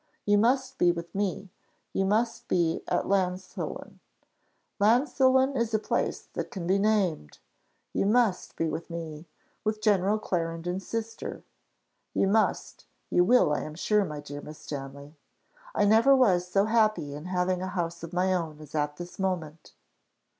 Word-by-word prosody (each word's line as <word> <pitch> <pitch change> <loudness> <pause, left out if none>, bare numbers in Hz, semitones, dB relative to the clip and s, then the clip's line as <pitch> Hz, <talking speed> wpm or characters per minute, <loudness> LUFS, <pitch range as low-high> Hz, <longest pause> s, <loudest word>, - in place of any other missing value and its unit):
You 205 0 +4
must 260 +4 +1
be 175 - +5
with 170 0 -7
me; 195 -1 -2 0.4
you 195 - +1
must 225 +4 0
be 170 -2 +1
at - - 0
Llansillen. 185 -1 -2 0.8
Llansillen 260 +4 +3
is 230 -3 0
a - - +5
place 215 - -2
that - - -4
can 185 -4 -6
be 190 +3 +2
named. 195 - 0 0.6
You - - +1
must 220 -4 +2
be 165 - 0
with 160 +3 -4
me 165 -1 -7 0.4
with 215 0 -1
General 205 -1 +2
Clarendon's 175 -1 -3
sister. 225 0 -5 0.7
You - - +3
must 215 +2 0 0.2
you 175 - +5
will, 200 -6 +4
I - - 0
am 155 - -7
sure, 210 +5 +2
my 150 -5 -5
dear 145 0 -8
Miss 150 +1 -10
Stanley. 140 +1 -8 0.6
I - - +3
never 225 +6 +6
was 185 -9 +3
so 195 +2 +2
happy 215 -9 +2
in 150 +3 -8
having 180 0 0
a 185 - -2
house 170 -2 -3
of 165 0 -7
my 185 +1 +1
own 160 -4 -3
as 155 -1 -13
at 150 -1 -1
this 175 +2 -9
moment. 170 -5 -3
185 Hz, 160 wpm, -28 LUFS, 165-215 Hz, 0.8 s, never